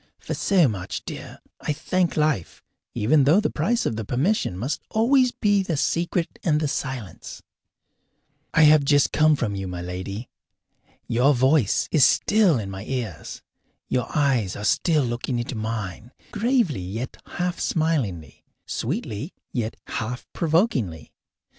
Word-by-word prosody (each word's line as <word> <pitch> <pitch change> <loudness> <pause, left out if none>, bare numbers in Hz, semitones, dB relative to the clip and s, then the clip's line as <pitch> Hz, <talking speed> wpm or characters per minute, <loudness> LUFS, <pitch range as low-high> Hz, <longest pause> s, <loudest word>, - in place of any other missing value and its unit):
For - - -5
so 185 -6 +3
much, 95 -6 -4
dear, - - -8 0.2
I 150 - -2
thank 180 +4 -1
life, 150 - 0 0.3
even 135 +6 +3
though 160 +8 +5
the 215 - 0
price 230 +10 0
of 110 - -1
the 110 - -3
permission 130 - 0
must 130 +9 -3
always 250 +3 +3
be 205 -4 +2
the 175 -5 -2
secret 170 +3 -1
and 150 -3 +2
the 155 - 0
silence. 130 - -5 1.1
I 165 - +5
have 150 -1 +7
just 145 0 +3
come 155 0 +4
from 120 -7 -2
you, 95 -1 -4
my 90 -1 -5
lady. 95 +6 -5 0.8
Your 130 +5 +3
voice 130 -3 +3
is 155 -5 +5
still 200 - +4
in 100 -4 -4
my 95 0 -6
ears; 115 -10 -5 0.5
your 125 - 0
eyes 130 -10 +1
are 105 - -5
still 155 - +2
looking 120 +1 -2
into 120 +2 -3
mine, 110 0 -5 0.2
gravely 220 - +1
yet 110 +8 -5 0.2
half 180 0 -1
smilingly, 135 - -1 0.2
sweetly 110 - -4 0.2
yet 115 -3 -2
half 120 +2 -4
provokingly. 155 - 0
135 Hz, 145 wpm, -24 LUFS, 110-165 Hz, 1.1 s, have